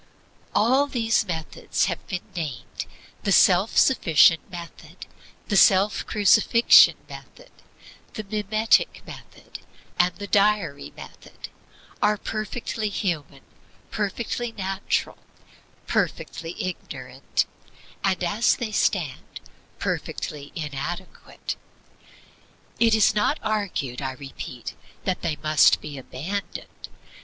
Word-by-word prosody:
All 260 +6 +4
these 225 -5 +1
methods 160 -3 -4
that - - +2
have - - -29
been 180 -4 -4
named 145 -9 -5 0.3
the 200 - -1
self 190 +2 +4
sufficient 165 - +5
method, 175 -2 -10 0.4
the 205 - -1
self 195 +2 +4
crucifixion 220 +2 +6
method, - - -13 0.6
the 215 - -5
mimetic 215 +2 +1
method, - - -11 0.4
and 175 0 +3
the 205 - -7
diary 200 -8 +1
method - - -11 0.5
are 210 0 +3
perfectly 215 +1 -3
human, 160 -9 -3 0.5
perfectly 230 +3 -2
natural, 195 -2 -2 0.7
perfectly 165 0 -2
ignorant, 185 -1 -3 0.6
and 190 -2 +1
as 205 +6 +2
they 230 -3 -4
stand 170 -10 -1 0.4
perfectly 145 -1 -4
inadequate. 165 +4 -5 1.2
It 230 -1 +5
is 220 - +4
not 210 +8 +1
argued, 200 - -2
I 130 -1 -3
repeat, 130 -3 -8 0.3
that 185 -2 -1
they 165 -3 -1
must 155 0 +4
be 145 -2 -8
abandoned. 170 +11 -6
195 Hz, 100 wpm, -24 LUFS, 160-215 Hz, 1.2 s, crucifixion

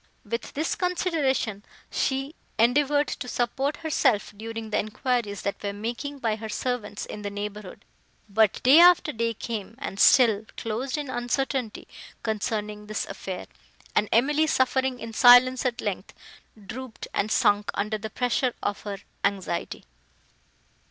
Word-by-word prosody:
With 230 0 -4
this 310 +3 0
consideration, 300 - 0 0.3
she 270 +2 -1 0.2
endeavoured 290 +5 +3
to - - -5
support 265 +4 -1
herself, 260 -9 +1
during 225 +1 -6
the - - +2
enquiries, 215 -1 -2
that 200 - -3
were 200 -1 -3
making 240 +7 -4
by 225 -5 -1
her 220 0 -7
servants 215 -3 -3
in 210 - -8
the 205 - -3
neighbourhood; 205 -1 -7 0.4
but 215 0 +2
day 270 +6 +8
after 350 -3 +7
day 230 -3 -1
came, 220 -1 -5
and 200 -6 -6
still 230 -5 +6
closed 245 +5 -3
in 295 -1 -4
uncertainty, 245 -1 -2 0.4
concerning 210 -1 -3
this 215 -1 -2
affair: 185 -2 -6 0.5
and 210 - +2
Emily, 295 +7 +3
suffering 260 -2 +1
in 230 0 -7
silence, 255 +2 +7
at 245 - -3
length, - - -4 0.5
drooped, 250 +3 -7
and 215 - 0
sunk 205 -3 +3
under 215 +1 -1
the 220 +1 -5
pressure 250 +1 0
of 205 - -2
her 205 -1 -5 0.3
anxiety. 195 -4 -2
230 Hz, 140 wpm, -26 LUFS, 210-265 Hz, 0.5 s, day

